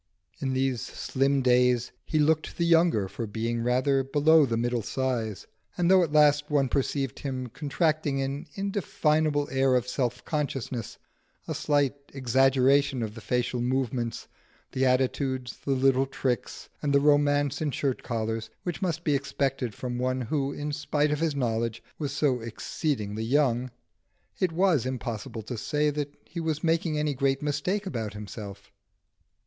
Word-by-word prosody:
In 135 -1 -1
these 130 -2 0
slim 135 0 0
days 125 -1 +3
he 155 - -1
looked 155 +1 +1
the 170 - +1
younger 165 - +4
for 115 +4 -5
being 115 +2 -2
rather 130 +3 +2
below 145 +2 +4
the 115 -1 -1
middle 120 0 0
size, 115 -4 -2 0.3
and 175 +1 +3
though 190 -1 +7
at 160 - -2
last 150 -1 +4
one 140 -3 +2
perceived 135 -1 -1
him 130 -2 -3
contracting 150 +2 -1
an 140 +4 -3
indefinable 155 -7 +1
air 135 -1 +3
of 125 0 +1
self 125 -2 -2
consciousness, 135 -6 -3 0.5
a - - -2
slight 145 -3 +1 0.2
exaggeration 135 +1 +3
of 105 -1 -4
the 110 - -10
facial 125 +1 -1
movements, 125 -2 -1 0.4
the 130 0 +1
attitudes, 130 0 0
the - - -4
little 135 0 +3
tricks, 130 -3 -3
and 145 -1 0
the - - +6
romance 145 0 +3
in 155 - 0
shirt 135 -1 -1
collars, 110 -1 -3
which 175 -2 -4
must 170 -3 -1
be 150 - +2
expected 135 -4 -1
from 125 -1 -4
one 130 +1 0
who, 135 +3 -1
in 145 +1 -4
spite 150 0 0
of 150 - 0
his 160 -3 0
knowledge, 115 -3 -1 0.2
was 145 -3 -2
so 140 -3 +1
exceedingly 110 -1 -3
young, 130 -1 +2 0.7
it 185 -3 +1
was 170 - +3
impossible 115 -3 -4
to 115 +1 -5
say 150 +4 +1
that 145 -1 -3
he 170 - -7
was 160 -2 -2
making 165 -1 +1
any 150 -1 0
great 135 +1 0
mistake 150 +8 -1
about 115 - -3
himself. 105 -1 -8
135 Hz, 155 wpm, -27 LUFS, 125-150 Hz, 0.7 s, though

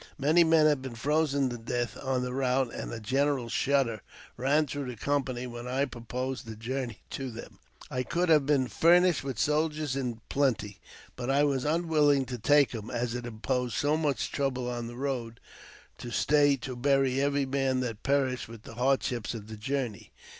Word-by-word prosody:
Many 155 +5 +4
men 160 -1 +5
had 150 -3 +3
been 130 -3 -7
frozen 140 +2 +1
to 120 -1 -6
death 120 +1 -2
on 130 -1 0
the 125 0 -3
route, 130 -1 +1
and - - -5
a 115 - -5
general 135 +2 0
shudder 130 -5 +1 0.3
ran 140 +5 +2
through 145 -1 -4
the 125 - -5
company 130 0 -1
when 120 0 -7
I 135 +3 +1
proposed 125 0 -5
the 110 - -6
journey 120 0 -4
to 135 -1 -4
them. 115 -1 -10 0.3
I 125 - -1
could 175 +7 0
have 150 -4 +4
been 140 -3 +3
furnished 175 +1 +4
with 135 -4 -4
soldiers 150 0 0
in 125 -4 -3
plenty, 115 -8 0 0.4
but 125 0 -4
I 140 +2 +4
was 140 -2 +1
unwilling 150 -3 +3
to 125 -1 -6
take 145 +5 +4
them, 110 -2 -6
as 120 -1 -2
it 120 0 -4
imposed 120 +1 -2
so 145 +1 +2
much 150 -3 -1
trouble 130 -3 -1
on 120 -1 -3
the 120 - -8
road 125 -4 -3 0.6
to 120 - -6
stay 145 +3 +3
to 130 0 -6
bury 135 0 +2
every 140 0 +1
man 135 -1 0
that 115 -4 -4
perished 135 -3 0
with 115 -1 -11
the - - -10
hard 130 +3 +2
ships 120 -1 -3
of 110 -1 -8
the 110 - -6
journey. 125 -1 -3
130 Hz, 190 wpm, -29 LUFS, 120-145 Hz, 0.6 s, men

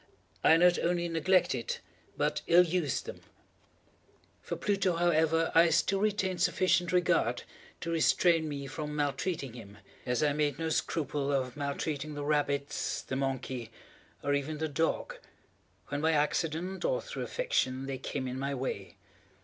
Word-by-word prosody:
I 160 - +7
not 175 +1 +5
only 175 0 0
neglected, 165 -7 +1 0.4
but - - 0
ill 175 +1 +7
used 170 -4 -1
them. - - -8 1.2
For - - -4
Pluto, 195 -3 +1
however, 165 -1 +2
I 165 +1 +6
still 165 +5 +2
retained 190 -4 0
sufficient 180 -1 +2
regard 175 -9 +2 0.4
to 170 - -3
restrain 165 0 +3
me 140 -1 -5
from 150 +2 -5
maltreating 145 -1 -2
him, 105 -4 -11 0.3
as 125 +3 +1
I 145 -1 +3
made 145 -2 0
no 165 0 -2
scruple 145 -3 -1
of 130 -2 -1
maltreating 145 +1 -3
the 145 0 -4
rabbits, 145 -1 -1
the 130 - -4
monkey, 130 -3 -3 0.5
or 145 - +1
even 145 +2 -1
the 160 +1 -1
dog, 165 - -1 0.7
when 145 - -2
by 160 +1 +3
accident, 165 +5 0
or - - +1
through - - -6
affection, 135 - -1
they 135 -1 -4
came 130 0 -4
in 130 +1 -4
my 140 +1 -2
way. 125 -7 -4
155 Hz, 150 wpm, -30 LUFS, 140-175 Hz, 1.2 s, I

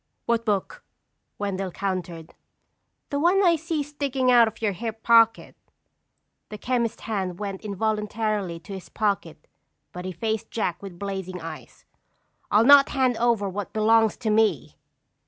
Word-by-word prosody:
"What 230 -1 0
book?" 210 - -2 0.5
Wendell 195 -2 -3
countered. 180 -4 -5 0.8
"The 285 - 0
one 360 +6 +3
I 345 -2 +5
see 325 -1 -2
sticking 275 -3 -1
out 240 -2 +6
of 220 - -7
your 215 -2 0
hip 220 +3 -6
pocket." 230 -1 +4 0.9
The 210 - -7
chemist's 235 -1 -1
hand 190 -5 -3
went 195 -1 -5
involuntarily 210 -3 -2
to 195 - -9
his 180 -5 -9
pocket 200 0 -2 0.5
but 180 0 -8
he 185 - -3
faced 220 +4 -3
Jack 185 -6 -2
with 195 -3 -9
blazing 190 -2 -5
eyes. 165 -2 -10 0.6
"I'll 215 +2 +4
not 280 +1 +8
hand 260 -3 +1
over 230 -4 +1
what 195 +1 -5
belongs 220 0 +3
to 220 -3 -1
me." 220 0 +1
215 Hz, 145 wpm, -25 LUFS, 195-235 Hz, 0.9 s, not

